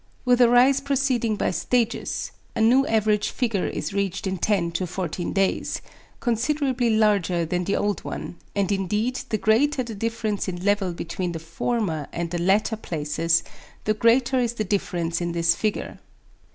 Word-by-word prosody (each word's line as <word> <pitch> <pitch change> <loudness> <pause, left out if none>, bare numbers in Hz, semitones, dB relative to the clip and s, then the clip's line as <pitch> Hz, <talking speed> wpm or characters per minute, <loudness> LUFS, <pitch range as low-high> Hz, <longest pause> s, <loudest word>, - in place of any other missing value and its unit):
With 250 0 +4
a 240 - +7
rise 255 +3 +5
proceeding 265 -5 +1
by - - 0
stages, 235 +4 -1 0.2
a - - -2
new 255 +5 +5
average 215 -1 +2
figure 225 -7 -1
is - - -4
reached 195 -1 -1
in 190 -1 -2
10 175 -3 +1
to 180 +2 -2
14 175 0 -3
days, 195 -1 0 0.4
considerably 250 +1 0
larger 200 -6 +2
than 180 +2 -1
the 200 - 0
old 205 -1 -1
one, 175 - -6 0.2
and 200 -1 +1
indeed 210 +6 0
the 215 - +1
greater 255 +6 +2
the 230 -2 -7
difference 215 -1 -2
in 180 0 -4
level 200 -2 +2
between 170 +1 -4
the - - -3
former 165 - -2
and 170 -1 -3
the 175 -1 -2
latter 205 +5 +2
places, 165 -2 0 0.4
the 215 - +2
greater 240 +4 +3
is 240 -2 0
the 220 - -2
difference 175 -4 -1
in 170 0 -2
this 170 0 +3
figure. 215 +3 -3
205 Hz, 165 wpm, -24 LUFS, 175-235 Hz, 0.4 s, a